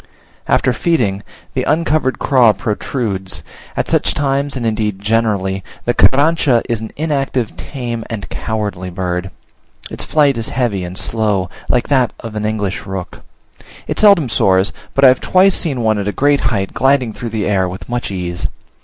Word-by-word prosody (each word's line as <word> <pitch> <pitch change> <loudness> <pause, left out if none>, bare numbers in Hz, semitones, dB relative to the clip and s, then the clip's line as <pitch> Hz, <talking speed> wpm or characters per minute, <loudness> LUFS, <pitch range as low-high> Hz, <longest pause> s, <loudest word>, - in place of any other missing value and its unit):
After 130 - +2
feeding, 110 - 0 0.3
the 130 - 0
uncovered 150 -1 +1
craw 125 -5 +4
protrudes; 105 -4 -3 0.3
at - - 0
such - - +1
times, 140 0 0
and 120 - -3
indeed 110 -3 -1
generally, 100 -3 0 0.2
the 120 - +2
Carrancha 140 -3 +4
is 115 -3 -1
an 110 - -5
inactive, 140 -6 -1
tame, 120 -4 -5
and 110 -3 -5
cowardly 105 -4 -3
bird. 90 0 -3 0.6
Its - - -4
flight 145 -5 +2
is 115 - -4
heavy 115 -8 -1
and 90 +1 -6
slow, 105 -5 0 0.2
like 125 - +2
that 130 -4 +2
of 115 -2 -7
an 105 0 -2
English 105 -3 -3
rook. 95 -2 -6 0.6
It - - -3
seldom 200 -9 +6
soars; 95 -3 +2 0.2
but 140 - +5
I - - +10
have 130 - +2
twice 190 +1 +4
seen 140 -7 +1
one 110 -2 +2
at 100 - -3
a - - +1
great 145 +5 +2
height 100 -5 -2
gliding 135 -4 +2
through 120 0 -5
the 110 -3 -2
air 95 -2 +1
with 95 +2 -8
much 120 0 -3
ease. 90 -2 -3
115 Hz, 170 wpm, -17 LUFS, 100-135 Hz, 0.6 s, I